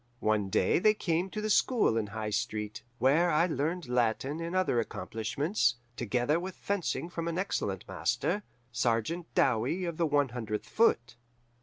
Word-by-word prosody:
One 105 Hz, -2 st, +1 dB
day 95 Hz, -, +3 dB
they 215 Hz, +3 st, +4 dB
came 175 Hz, -1 st, 0 dB
to 215 Hz, -, -4 dB
the 215 Hz, -, -2 dB
school 230 Hz, -, +3 dB
in 110 Hz, -2 st, 0 dB
High 110 Hz, 0 st, -4 dB
Street, 105 Hz, 0 st, -2 dB, 0.2 s
where 145 Hz, +9 st, +4 dB
I 160 Hz, +1 st, +3 dB
learned 160 Hz, 0 st, -2 dB
Latin 125 Hz, +5 st, 0 dB
and 170 Hz, +2 st, -4 dB
other 185 Hz, -10 st, +2 dB
accomplishments, 120 Hz, -, -1 dB, 0.2 s
together 125 Hz, +7 st, 0 dB
with 185 Hz, +1 st, -6 dB
fencing 200 Hz, -4 st, -2 dB
from 170 Hz, -1 st, -4 dB
an 170 Hz, 0 st, -2 dB
excellent 100 Hz, -, -2 dB
master, 200 Hz, +5 st, -1 dB, 0.3 s
Sergeant 120 Hz, +9 st, -1 dB
Dowie 130 Hz, +9 st, +2 dB
of 170 Hz, -2 st, -4 dB
the 170 Hz, -, +2 dB
One 145 Hz, -2 st, +2 dB
Hundredth 110 Hz, -3 st, -4 dB
Foot. 125 Hz, -, +2 dB
145 Hz, 160 wpm, -30 LUFS, 115-175 Hz, 0.3 s, they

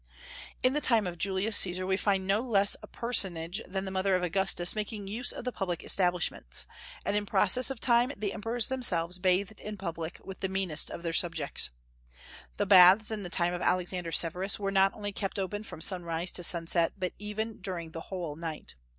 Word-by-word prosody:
In 255 Hz, +1 st, +3 dB
the 300 Hz, -, 0 dB
time 230 Hz, -7 st, +3 dB
of 175 Hz, -1 st, -6 dB
Julius 195 Hz, +4 st, +2 dB
Caesar 185 Hz, 0 st, +3 dB
we 190 Hz, 0 st, +1 dB
find 195 Hz, -1 st, 0 dB
no 200 Hz, +3 st, +1 dB
less 200 Hz, -5 st, +2 dB
a -, -, -11 dB
personage 190 Hz, -5 st, -2 dB
than 190 Hz, +1 st, -4 dB
the 190 Hz, -, -4 dB
mother 190 Hz, 0 st, +1 dB
of 180 Hz, -, -1 dB
Augustus 180 Hz, 0 st, +2 dB
making 210 Hz, -1 st, -4 dB
use 225 Hz, +5 st, -1 dB
of -, -, -7 dB
the 250 Hz, -, -1 dB
public 180 Hz, -6 st, -4 dB
establishments; 175 Hz, -, 0 dB, 0.4 s
and -, -, 0 dB
in 205 Hz, 0 st, -1 dB
process 245 Hz, +8 st, +4 dB
of 270 Hz, -3 st, -5 dB
time 240 Hz, +2 st, +3 dB
the 200 Hz, -1 st, -3 dB
Emperors 225 Hz, +2 st, -2 dB
themselves 180 Hz, -9 st, +1 dB
bathed 185 Hz, +3 st, 0 dB
in 210 Hz, 0 st, -7 dB
public 170 Hz, -3 st, -6 dB
with 195 Hz, -, -9 dB
the 190 Hz, -, -2 dB
meanest 190 Hz, -5 st, 0 dB
of 170 Hz, -, -8 dB
their 165 Hz, -1 st, -2 dB
subjects. 165 Hz, -4 st, 0 dB, 0.9 s
The -, -, 0 dB
baths 190 Hz, +3 st, +7 dB
in 215 Hz, -1 st, -3 dB
the 180 Hz, -, -6 dB
time 175 Hz, 0 st, 0 dB
of 175 Hz, -, -4 dB
Alexander 180 Hz, -1 st, -1 dB
Severus 180 Hz, +4 st, +1 dB
were 195 Hz, -1 st, -2 dB
not 195 Hz, 0 st, +4 dB
only 205 Hz, -1 st, -5 dB
kept 195 Hz, 0 st, -4 dB
open 200 Hz, +2 st, -3 dB
from 190 Hz, -7 st, -10 dB
sunrise 175 Hz, -1 st, +1 dB
to 175 Hz, -, -2 dB
sunset, 170 Hz, 0 st, +2 dB
but 185 Hz, -2 st, -3 dB
even 215 Hz, +2 st, -4 dB
during 175 Hz, -4 st, -5 dB
the 165 Hz, -, -7 dB
whole 175 Hz, -6 st, -5 dB
night. 160 Hz, -1 st, -6 dB
190 Hz, 200 wpm, -29 LUFS, 175-210 Hz, 0.9 s, baths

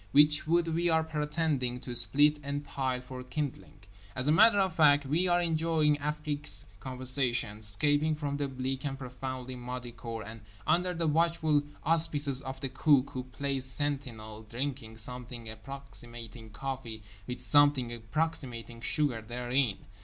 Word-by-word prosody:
Which 150 Hz, +1 st, +6 dB
wood 170 Hz, +1 st, +2 dB
we 170 Hz, +2 st, +1 dB
are 160 Hz, -1 st, +3 dB
pretending 150 Hz, -5 st, -1 dB
to 125 Hz, -, -6 dB
split 145 Hz, +6 st, +4 dB
and 145 Hz, 0 st, -4 dB
pile 130 Hz, -2 st, -2 dB
for 125 Hz, 0 st, -8 dB
kindling. 135 Hz, +2 st, -5 dB, 0.3 s
As 130 Hz, +2 st, -1 dB
a -, -, +4 dB
matter 210 Hz, +6 st, +6 dB
of 190 Hz, -3 st, +1 dB
fact 145 Hz, -3 st, +5 dB
we 160 Hz, +7 st, +1 dB
are 175 Hz, 0 st, +3 dB
enjoying 160 Hz, -3 st, +1 dB
Afrique's 150 Hz, 0 st, +1 dB
conversation, 125 Hz, -3 st, -1 dB
escaping 145 Hz, +9 st, +3 dB
from 145 Hz, -2 st, -3 dB
the 145 Hz, -1 st, -1 dB
bleak 130 Hz, 0 st, -4 dB
and 135 Hz, -2 st, -3 dB
profoundly 130 Hz, 0 st, -6 dB
muddy 125 Hz, 0 st, -6 dB
cour, 115 Hz, 0 st, -7 dB
and 110 Hz, +1 st, -10 dB, 0.2 s
(under 180 Hz, +1 st, +1 dB
the 165 Hz, 0 st, -1 dB
watchful 160 Hz, -1 st, +2 dB, 0.2 s
auspices 150 Hz, -4 st, +3 dB
of 130 Hz, 0 st, -7 dB
the 135 Hz, -, -2 dB
Cook, 140 Hz, 0 st, +3 dB
who 125 Hz, -1 st, -5 dB
plays 135 Hz, 0 st, -1 dB
sentinel) 130 Hz, -6 st, -2 dB
drinking 125 Hz, -3 st, -5 dB
something 120 Hz, 0 st, -3 dB
approximating 120 Hz, -2 st, -9 dB
coffee 115 Hz, -1 st, -6 dB, 0.2 s
with 125 Hz, 0 st, -5 dB
something 135 Hz, -2 st, +4 dB
approximating 120 Hz, -1 st, -4 dB
sugar 140 Hz, -4 st, +1 dB
therein. 120 Hz, 0 st, -1 dB
135 Hz, 145 wpm, -30 LUFS, 125-150 Hz, 0.3 s, Which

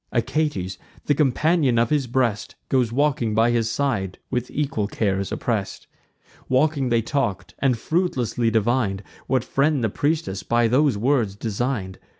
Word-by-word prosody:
Achates, 125 Hz, -, -1 dB, 0.3 s
the 145 Hz, -, +3 dB
companion 145 Hz, -1 st, +2 dB
of 115 Hz, +2 st, +2 dB
his 145 Hz, -4 st, +1 dB
breast, 120 Hz, -4 st, -1 dB
Goes 125 Hz, -3 st, +2 dB
grieving 125 Hz, -4 st, 0 dB
by 115 Hz, +2 st, +4 dB
his 115 Hz, -1 st, +1 dB
side, 115 Hz, -7 st, -1 dB
with 125 Hz, 0 st, -2 dB
equal 135 Hz, -8 st, -1 dB
cares 100 Hz, -3 st, -1 dB
oppress'd. -, -, -3 dB, 0.6 s
Walking, 135 Hz, 0 st, +2 dB
they 115 Hz, -1 st, +2 dB
talk'd, 120 Hz, -6 st, -2 dB
and 130 Hz, -4 st, +2 dB
fruitlessly 125 Hz, -, 0 dB
divin'd 110 Hz, -2 st, 0 dB, 0.2 s
What 130 Hz, -2 st, +1 dB
friend 140 Hz, 0 st, +1 dB
the 110 Hz, -, +2 dB
priestess 145 Hz, -, -1 dB
by 120 Hz, 0 st, +2 dB
those 130 Hz, 0 st, +3 dB
words 115 Hz, -3 st, +1 dB
design'd. 110 Hz, -2 st, -3 dB
120 Hz, 145 wpm, -23 LUFS, 110-140 Hz, 0.6 s, by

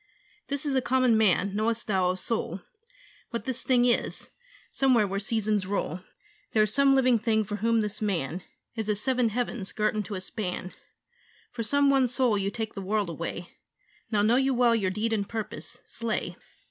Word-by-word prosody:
'This 280 Hz, +1 st, -3 dB
is 285 Hz, -, 0 dB
a 260 Hz, -, +2 dB
common 255 Hz, -2 st, +3 dB
man: 200 Hz, -2 st, +2 dB
knowest 225 Hz, +2 st, 0 dB
thou, 190 Hz, -3 st, +1 dB
O 185 Hz, -, 0 dB
soul, 220 Hz, +4 st, -3 dB, 0.7 s
What 235 Hz, -2 st, -4 dB
this 260 Hz, -1 st, -2 dB
thing 245 Hz, -2 st, +3 dB
is? 240 Hz, -1 st, 0 dB, 0.4 s
somewhere 255 Hz, -5 st, +3 dB
where 195 Hz, 0 st, -2 dB
seasons 210 Hz, -2 st, 0 dB
roll 190 Hz, -3 st, -2 dB, 0.5 s
There 215 Hz, -, +5 dB
is 215 Hz, 0 st, -1 dB
some 275 Hz, +1 st, +5 dB
living 255 Hz, -3 st, +4 dB
thing 220 Hz, 0 st, +1 dB
for 210 Hz, 0 st, -4 dB
whom 230 Hz, +1 st, +2 dB
this 210 Hz, 0 st, -3 dB
man 180 Hz, -5 st, -1 dB, 0.3 s
Is 220 Hz, -2 st, -4 dB
as 210 Hz, -1 st, +1 dB
seven 250 Hz, 0 st, +1 dB
heavens 235 Hz, -3 st, -3 dB
girt 215 Hz, 0 st, 0 dB
into 210 Hz, -1 st, -3 dB
a 185 Hz, -, -4 dB
span, 185 Hz, -2 st, -4 dB, 0.8 s
For 240 Hz, -, -5 dB
some 280 Hz, +5 st, +3 dB
one 270 Hz, -2 st, +4 dB
soul 245 Hz, -2 st, +2 dB
you 200 Hz, -1 st, 0 dB
take 220 Hz, +1 st, -4 dB
the 195 Hz, -, -6 dB
world 200 Hz, -1 st, -1 dB
away 170 Hz, +2 st, -6 dB, 0.5 s
Now 210 Hz, -2 st, +2 dB
know 230 Hz, +4 st, +4 dB
you 265 Hz, 0 st, +2 dB
well 240 Hz, -1 st, +4 dB
your 200 Hz, -4 st, +1 dB
deed 215 Hz, +4 st, -1 dB
and 200 Hz, -2 st, -1 dB
purpose. 220 Hz, -2 st, -5 dB
Slay!' 230 Hz, -2 st, -3 dB
220 Hz, 185 wpm, -27 LUFS, 200-245 Hz, 0.8 s, There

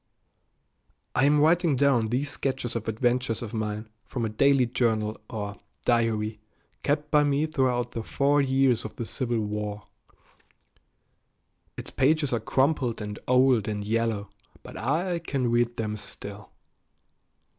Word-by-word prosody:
I 135 Hz, -, +3 dB
am 145 Hz, +1 st, +4 dB
writing 165 Hz, 0 st, +4 dB
down 125 Hz, -4 st, +3 dB
these 130 Hz, +6 st, -1 dB
sketches 130 Hz, -3 st, -2 dB
of 115 Hz, -1 st, -3 dB
adventures 120 Hz, +1 st, 0 dB
of 115 Hz, -1 st, -7 dB
mine 110 Hz, 0 st, -3 dB, 0.2 s
from 120 Hz, -3 st, -3 dB
a -, -, -1 dB
daily 135 Hz, +4 st, +4 dB
journal 110 Hz, -3 st, 0 dB
or 105 Hz, -2 st, -5 dB, 0.3 s
diary 110 Hz, -3 st, +1 dB, 0.4 s
kept 145 Hz, +1 st, -1 dB
by 150 Hz, -1 st, +5 dB
me 145 Hz, +1 st, +2 dB
throughout 125 Hz, -5 st, 0 dB
the 115 Hz, -, -4 dB
four 140 Hz, +5 st, +2 dB
years 135 Hz, -3 st, +2 dB
of 110 Hz, -, -7 dB
the 115 Hz, -, -4 dB
Civil 120 Hz, -1 st, -2 dB
War. 105 Hz, 0 st, -4 dB, 1.9 s
Its -, -, -6 dB
pages 145 Hz, 0 st, +2 dB
are 120 Hz, -, +1 dB
crumpled 130 Hz, +1 st, +1 dB
and 105 Hz, -1 st, -5 dB
old 125 Hz, -3 st, +4 dB
and 105 Hz, -1 st, -3 dB
yellow, 110 Hz, -2 st, -1 dB, 0.3 s
but -, -, -10 dB
I 170 Hz, +8 st, 0 dB
can 135 Hz, -7 st, -1 dB
read 120 Hz, 0 st, +1 dB
them 105 Hz, -1 st, -2 dB
still. 100 Hz, 0 st, -9 dB
120 Hz, 140 wpm, -27 LUFS, 110-140 Hz, 1.9 s, by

